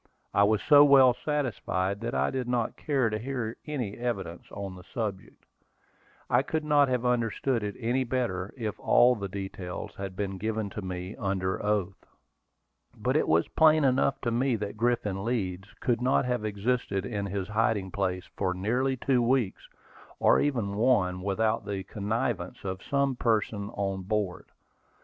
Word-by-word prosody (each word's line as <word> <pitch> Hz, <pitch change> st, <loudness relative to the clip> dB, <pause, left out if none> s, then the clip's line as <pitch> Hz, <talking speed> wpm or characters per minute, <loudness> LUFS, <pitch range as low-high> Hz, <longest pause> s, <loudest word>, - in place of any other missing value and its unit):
I 100 Hz, -, +4 dB
was 105 Hz, 0 st, +1 dB
so 145 Hz, -1 st, +8 dB
well 135 Hz, -3 st, +7 dB
satisfied 115 Hz, -9 st, -2 dB
that 115 Hz, +1 st, -3 dB
I -, -, +1 dB
did 130 Hz, -2 st, -3 dB
not 120 Hz, -2 st, 0 dB
care 135 Hz, -7 st, 0 dB
to 110 Hz, -, -2 dB
hear 120 Hz, -2 st, -3 dB
any 125 Hz, -9 st, -3 dB
evidence 95 Hz, -8 st, -3 dB
on 100 Hz, -2 st, -6 dB
the 90 Hz, -, -11 dB
subject. 100 Hz, -2 st, -5 dB, 0.8 s
I -, -, +3 dB
could 160 Hz, -1 st, -2 dB
not 145 Hz, -2 st, +4 dB
have 125 Hz, -1 st, -1 dB
understood 120 Hz, +1 st, +1 dB
it 105 Hz, -1 st, -4 dB
any 125 Hz, +2 st, 0 dB
better 115 Hz, -7 st, -2 dB
if 110 Hz, -4 st, -4 dB
all 125 Hz, +1 st, +5 dB
the 100 Hz, -3 st, -4 dB
details 95 Hz, -2 st, -6 dB
had 95 Hz, -1 st, -5 dB
been 95 Hz, -1 st, -3 dB
given 110 Hz, -1 st, -2 dB
to 105 Hz, -, -5 dB
me 90 Hz, +1 st, -5 dB
under 95 Hz, -2 st, -1 dB
oath. 100 Hz, -3 st, -1 dB, 0.9 s
But -, -, 0 dB
it -, -, +2 dB
was 80 Hz, +1 st, +3 dB
plain 155 Hz, -1 st, +5 dB
enough 135 Hz, 0 st, +2 dB
to 120 Hz, -, -1 dB
me 125 Hz, +2 st, +1 dB
that 105 Hz, -1 st, -4 dB
Griffin 110 Hz, -4 st, 0 dB
Leeds 95 Hz, -5 st, -2 dB
could 120 Hz, -1 st, +1 dB
not 130 Hz, +1 st, +2 dB
have 125 Hz, -3 st, -1 dB
existed 105 Hz, -2 st, -1 dB
in 100 Hz, -2 st, -3 dB
his 100 Hz, 0 st, -3 dB
hiding 105 Hz, -3 st, 0 dB
place 90 Hz, -2 st, -2 dB
for 95 Hz, -2 st, -1 dB
nearly 125 Hz, +8 st, 0 dB
two 125 Hz, 0 st, +2 dB
weeks, 120 Hz, -4 st, 0 dB, 0.5 s
or -, -, +4 dB
even 115 Hz, -9 st, -1 dB
one, 100 Hz, -6 st, +2 dB
without 110 Hz, +3 st, 0 dB
the 100 Hz, -2 st, -3 dB
connivance 105 Hz, +3 st, -3 dB
of 95 Hz, -1 st, -4 dB
some 140 Hz, -1 st, 0 dB
person 105 Hz, -3 st, 0 dB
on 95 Hz, -1 st, -2 dB
board. 100 Hz, -2 st, -2 dB
110 Hz, 165 wpm, -28 LUFS, 95-125 Hz, 0.9 s, so